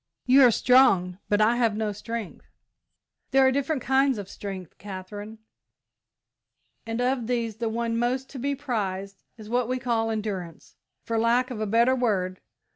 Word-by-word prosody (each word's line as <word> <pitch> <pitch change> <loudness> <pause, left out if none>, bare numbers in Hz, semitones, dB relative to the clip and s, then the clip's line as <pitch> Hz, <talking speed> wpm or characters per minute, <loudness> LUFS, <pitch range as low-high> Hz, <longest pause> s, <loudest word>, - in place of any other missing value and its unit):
"You 260 +2 +6
are 250 - +8
strong, 200 -8 +4
but 205 0 +3
I 230 +3 +4
have 230 -3 +1
no 215 -1 -1
strength." 225 0 -7 0.8
"There 270 0 +4
are 260 - +5
different 275 0 -1
kinds 265 -1 +2
of 200 -2 -6
strength, 190 -5 -8
Katherine, 205 +2 -8 1.5
and 225 +1 -3
of 250 -2 0
these 230 -3 -2
the 230 0 -2
one 230 0 -1
most 255 +2 -1
to 270 - -7
be 280 +3 -1
prized 200 -8 -4 0.2
is 215 -2 -11
what 240 +1 0
we 255 +1 -1
call 235 -3 0
endurance, 205 -6 -5 0.3
for 230 -1 -1
lack 240 +3 +2
of 220 -3 -5
a 215 - -1
better 235 +5 +3
word. 195 -7 -1
230 Hz, 165 wpm, -26 LUFS, 205-250 Hz, 1.5 s, are